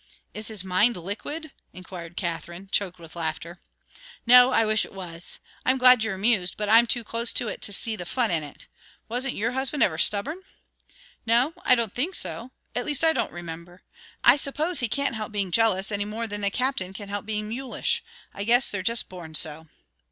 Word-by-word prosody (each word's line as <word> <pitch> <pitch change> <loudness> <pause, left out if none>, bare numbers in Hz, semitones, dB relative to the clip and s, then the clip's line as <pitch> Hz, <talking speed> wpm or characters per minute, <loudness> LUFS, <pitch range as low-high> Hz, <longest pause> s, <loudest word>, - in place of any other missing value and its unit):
"Is 215 +1 -4
his 215 -4 -4
mind 190 +5 +2
liquid?" 275 - -5 0.2
inquired 175 -2 -10
Katherine, 175 +2 -5
choked 185 -3 -1
with 165 -1 -14
laughter. 170 +1 -5 0.7
"No 250 +1 +8
I 225 - +3
wish 215 0 +3
it - - -10
was. 175 -3 -8 0.2
I'm 260 +1 +2
glad 250 -3 +6
you're 220 -3 -2
amused, 195 -2 +1
but 210 - -2
I'm 230 +3 +6
too 240 0 +2
close 230 +2 +1
to 240 - +3
it - - -5
to - - -2
see 220 +3 +1
the 175 -4 -8
fun 240 0 0
in 165 -2 +1
it. 145 -2 -11 0.4
Wasn't 250 +3 -1
your 230 +3 -1
husband 265 +3 0
ever 160 -3 0
stubborn?" 280 - +2 0.9
"No; 245 +7 +3
I 250 - +6
don't 230 -4 -1
think 330 +10 -1
so 235 - -1 0.2
at 245 - -1
least, 295 0 +1
I 320 0 +5
don't - - -2
remember. 175 +1 -9 0.4
I 245 +4 +7
suppose 300 +5 0
he 245 - +2
can't 280 +2 -1
help 220 -1 -5
being 200 -3 -3
jealous 205 -2 +2
any 205 0 -2
more 220 +2 -4
than 205 -1 -5
the 200 - +2
Captain 220 -5 -2
can 200 +1 -9
help 205 0 -5
being 210 -1 -3
mulish. 250 +4 -2 0.3
I 200 - -5
guess 240 +4 +4
they're 200 - -2
just 230 +3 +1
born 170 -4 -10
so." 160 +1 0
215 Hz, 200 wpm, -25 LUFS, 185-245 Hz, 0.9 s, No